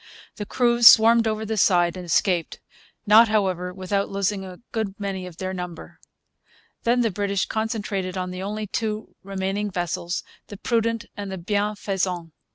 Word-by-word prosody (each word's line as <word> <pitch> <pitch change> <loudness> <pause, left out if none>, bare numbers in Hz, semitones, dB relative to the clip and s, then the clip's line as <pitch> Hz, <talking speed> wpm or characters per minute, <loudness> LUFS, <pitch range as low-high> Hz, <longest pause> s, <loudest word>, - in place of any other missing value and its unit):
The 210 - -5
crews 240 -1 +4
swarmed 230 0 +7
over 220 0 -2
the 220 0 -3
side 175 -3 +3
and 185 - -7
escaped; 175 0 +1 0.5
not, 220 +2 +7
however, 190 -4 0
without 195 +2 -2
losing 195 0 -1
a 185 -1 -9
good 215 -3 -3
many 195 -2 -4
of 170 -2 -12
their 185 0 -4
number. 180 -2 -7 0.9
Then 240 +1 +3
the 225 -2 +1
British 200 0 -1
concentrated 210 -4 -3
on 180 0 -3
the 185 0 -6
only 210 +2 -4
two 215 +1 -4
remaining 195 +1 -3
vessels, 175 -1 -3 0.2
the 205 - -9
Prudent 230 +1 0
and 200 -1 -6
the 190 - -4
Bienfaisant. 195 -3 -2
200 Hz, 160 wpm, -24 LUFS, 185-215 Hz, 0.9 s, swarmed